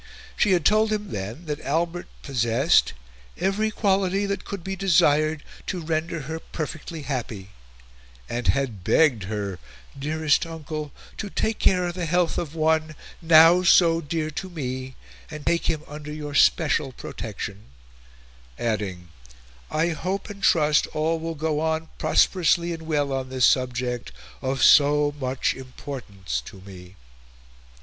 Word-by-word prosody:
She 205 - +3
had 175 -4 +1
told 215 +1 +4
him 210 -1 -2
then 105 - -5
that 150 -2 -3
Albert 170 +4 -1 0.2
possessed 125 +3 +2 0.4
"every 210 +3 0
quality 195 -2 +1
that 200 -1 -3
could 200 -4 -6
be 195 +2 -3
desired 155 -5 +3 0.2
to 185 - -2
render 160 0 -2
her 160 +4 -5
perfectly 155 0 -6
happy," 115 -8 -5 0.8
and 120 0 -3
had 125 -9 0
begged 125 - +3
her 100 -2 -4 0.4
"dearest 155 +2 +1
uncle 155 -2 -6 0.3
to 210 - -4
take 220 +2 -1
care 180 -1 +3
of 175 - -2
the 175 -2 -3
health 175 +1 +1
of 160 -2 -5
one, 155 -1 +1 0.3
now 165 +2 +7
so 170 -2 +5
dear 155 0 -3
to 185 +5 -5
me, 130 -5 -5 0.3
and 150 -1 -8
to - - +3
take 170 - 0
him 155 -2 -1
under 150 0 -8
your 150 -1 -6
special 150 -1 +3
protection," 105 -3 -7 0.9
adding, 100 -6 -3 0.6
"I 160 +2 +1
hope 185 +5 -3
and 200 -1 -11
trust 150 -5 +3
all 160 +2 0
will 165 0 -4
go 155 0 -1
on 160 0 -1
prosperously 170 -1 +2
and 160 -1 -8
well 145 -3 0
on 130 -1 -3
this 130 -1 +2
subject 125 - 0 0.3
of 135 +1 -1
so 145 0 +5
much 130 -1 0
importance 120 - -6
to 95 - -11
me." 95 -1 -12
155 Hz, 145 wpm, -24 LUFS, 130-170 Hz, 0.9 s, now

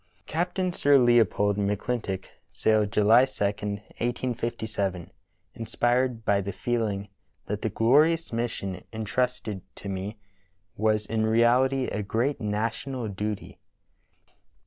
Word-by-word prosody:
Captain 180 +2 -1
Sir 145 -3 +5
Leopold 115 -5 +3
McClintock 100 -1 -2 0.2
sailed 105 -2 +2
July 110 +5 +6
2, 130 -5 -4
1857, 105 -1 -3 0.4
inspired 120 +1 0
by 100 -1 +3
the 100 +1 -4
feeling 105 -4 -2 0.4
that 105 0 -3
"the 110 - 0
glorious 150 - +3
mission 105 -6 -3
in 110 -1 -4
trusted 125 -4 -1
to - - -9
me 95 +3 -4 0.6
was 110 0 +1
in 110 0 -1
reality 125 +4 +3
a 105 - -2
great 115 +8 -1
national 110 +3 -2
duty." 105 +1 -5
110 Hz, 110 wpm, -27 LUFS, 105-125 Hz, 0.6 s, July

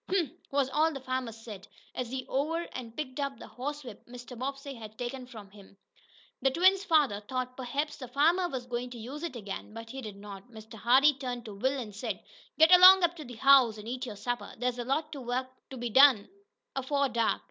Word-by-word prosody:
"Humph!" 360 -8 +1 0.2
was 275 -1 +1
all 310 +4 +2
the 275 - -6
farmer 255 -2 -3
said, 215 -3 -10 0.3
as 250 -2 -4
he 260 0 -4
over 315 +5 -1
and 235 -3 -8
picked 280 -3 -5
up 275 -1 -2
the - - -10
horsewhip 265 -3 -7
Mr. 245 +1 -10
Bobbsey 275 +3 -5
had 220 -3 -11
taken 250 +1 -5
from 215 -6 -12
him. 200 -1 -17 0.6
The 270 - +3
twins' 375 +7 +4
father 300 - +3
thought 255 +4 -4
perhaps 280 +4 -3
the 255 - -8
farmer 330 +8 +2
was 255 -5 -5
going 245 0 -4
to 245 - -9
use 255 +7 -7
it 335 -6 -5
again, 210 -1 -7
but 230 0 -8
he 265 +1 -6
did 215 -4 -8
not. 200 +2 -11
Mr. 220 -1 -13
Hardee 260 +6 +4
turned 245 -3 -5
to 215 - -8
Will 260 +7 -1
and 215 -4 -7
said: 210 -3 -4 0.4
"Get 320 +2 +6
along 370 +1 +9
up 345 0 +2
to 310 - -7
the 245 -1 -9
house, 255 -3 +5
and 210 +1 -10
eat 255 +2 -4
your 210 - -6
supper! 245 +4 -4
There's 245 +1 -2
lots 295 +6 -2
o' 275 - -7
work 255 +1 -3 0.2
to 265 - -8
be 240 -1 -4
done 260 -5 +6 0.5
afore 280 +1 0
dark. 235 -3 0
255 Hz, 215 wpm, -29 LUFS, 230-280 Hz, 0.6 s, along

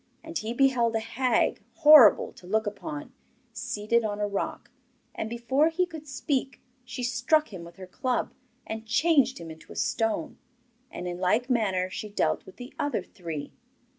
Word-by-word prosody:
And 325 +1 -9
he 220 -4 -2
beheld 240 -3 +2
a - - +2
hag, 230 +2 0
horrible 295 -8 +7
to 180 - -15
look 220 +3 +1
upon, 200 -8 -6 0.4
seated 230 -1 0
on 210 -1 -2
a 205 - 0
rock, 200 -1 -4 0.4
and 220 - -4
before 260 +6 +2
he 360 +3 +1
could 320 -3 -10
speak, 270 -1 -2 0.2
she 250 0 -6
struck 245 +3 +1
him 175 -3 -7
with 170 0 -12
her 190 - -9
club, 250 +7 -2 0.3
and 220 0 -6
changed 275 +2 +3
him 165 -1 -8
into 160 - -14
a - - -9
stone; 225 +7 -1 0.5
and 180 - -6
in 175 0 -5
like 225 +8 +1
manner 195 -6 +1
she 210 +3 -6
dealt 205 - -1
with 190 - -12
the 245 +1 -10
other 285 -10 -1
three. 165 -6 -7
230 Hz, 170 wpm, -27 LUFS, 200-265 Hz, 0.5 s, horrible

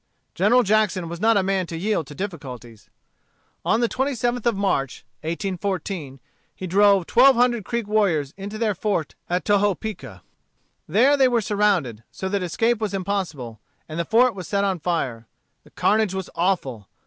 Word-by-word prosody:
General 225 +8 +4
Jackson 205 -4 +1
was 170 +1 -6
not 225 0 +4
a 195 - +2
man 190 -2 0
to 165 - -6
yield 190 -4 -1
to 145 - -10
difficulties. 130 - -8 0.7
On 225 - +2
the 235 - +3
27th 245 -2 -1
of 235 - +2
March, 140 -10 -1 0.2
1814, 175 -3 -4 0.4
he 185 - -6
drove 195 0 +4
twelve 265 +6 +6
hundred 240 -2 +2
Creek 235 -3 -3
warriors 180 -10 +1
into 200 +2 -7
their 215 -2 +1
fort 190 -5 -2 0.2
at 180 -2 -1
Tohopeka. 205 +1 -1 0.6
They 210 - +4 0.2
were 240 -2 +2
then - - -2
surrounded, 195 - 0
so 190 - -5
that 200 0 -1
escape 225 +6 0
was 205 -2 -2
impossible, 175 - -3 0.3
and 155 +1 -6
the - - +1
fort 235 +6 +3
was 185 -4 -8
set 200 -1 0
on 190 -3 0
fire. 130 -10 -2 0.4
The - - -19
carnage 215 -2 +1
was 190 -1 -5
awful. 140 - -1
195 Hz, 165 wpm, -23 LUFS, 165-215 Hz, 0.7 s, twelve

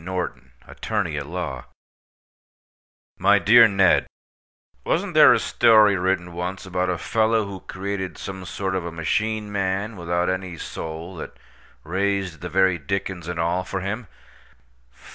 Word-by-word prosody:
NORTON, 85 -9 -5
ATTORNEY 100 -9 -3
AT 70 - -7
LAW 80 -7 -5 1.5
My 100 +2 +5
dear 115 +5 +7
Ned:—Wasn't 95 -2 -1
there - - +8
a - - +5
story 110 -3 +5
written 90 -1 -1
once 90 +3 -5
about 90 0 -1
a 90 - -1
fellow 110 +3 +1
who 100 -1 -7
created 95 -1 -5
some 95 -1 -7
sort 95 +3 -3
of 95 -2 -1
a 85 - -5
machine 105 +6 -1
man 100 +2 -2
without 85 0 -1
any 95 -2 -3
soul 80 +4 -7
that - - -8 0.5
raised 95 0 -2
the 90 - -5
very 95 0 +2
dickens 90 +2 -4
and 85 -1 -4
all 85 +2 0
for 95 +1 -4
him? 105 +4 -4
95 Hz, 140 wpm, -23 LUFS, 85-100 Hz, 1.5 s, there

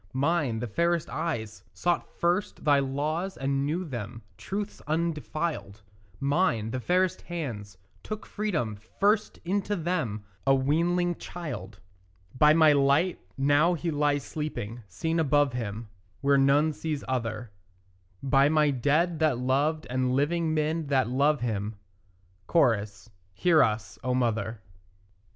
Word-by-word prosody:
Mine, 140 -3 +1
the 115 - -3
fairest 170 +7 0
eyes, 120 -10 -3
sought 175 -1 0
first 175 +3 0
thy 145 -2 +5
laws 150 +7 -2
and 135 +1 0
knew 175 +5 -1
them 115 - -6
Truths 200 - -5
undefiled; 155 -9 -2 0.4
Mine, 140 - +1
the 130 - -2
fairest 180 +6 +1
hands, 120 - -6 0.2
took 215 0 -6
freedom 165 - -2 0.2
first 210 +2 +2
into 200 +3 0
them, 155 - -2 0.2
A 135 - +6
weanling 170 +6 +1
child. 115 - -7 0.6
By 150 +4 +6
my 155 -1 +6
light, 140 +6 +2 0.2
now 145 +6 +3
he 170 +1 -2
lies 145 -2 +1
sleeping, 120 -2 -5
seen 160 - -2
above 145 -3 +3
him 115 -2 -4 0.3
Where 140 0 +4
none 145 +3 +4
sees 150 -1 -4
other; 115 -3 -3 0.7
By 135 +1 +4
my 150 -1 +3
dead 150 +6 +1
that 155 -6 +2
loved 140 +5 0
and 130 0 0
living 160 +4 +1
men 155 +1 0
that 130 -4 +2
love 140 +3 +2
him; 110 -2 -2 0.8
(Cho.) 120 -11 +4 0.5
Hear 165 - +4
us, 110 0 -1
O 125 0 0
mother. 115 -3 -1
145 Hz, 130 wpm, -27 LUFS, 125-165 Hz, 0.8 s, A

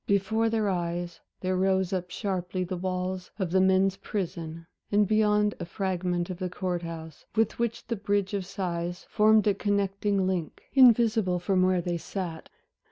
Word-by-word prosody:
Before 200 +3 +2
their 220 -2 +1
eyes 175 -2 -2 0.2
there 185 0 0
rose 190 0 +1
up 180 -1 -2
sharply 185 -1 -2
the 185 +1 -4
walls 185 0 -3
of 190 -5 -2
the 190 +1 +4
men's 190 0 +3
prison, 165 -4 -4 0.3
and 205 0 +4
beyond 210 -1 +3
a - - -4
fragment 180 -1 -2
of 180 - -7
the 185 -1 -2
Court 180 -1 -2
house, 160 -2 -8
with 225 0 +1
which 235 -1 -2
the 230 - -2
Bridge 205 -1 -1
of 200 -2 -1
Sighs 180 -2 -4
formed 215 -1 +5
a 205 - +4
connecting 200 -1 0
link, 180 -4 -2
invisible 225 -7 +5
from 185 +1 +1
where 185 -1 +3
they 175 0 -2
sat. 170 -3 -5
190 Hz, 165 wpm, -28 LUFS, 180-205 Hz, 0.3 s, formed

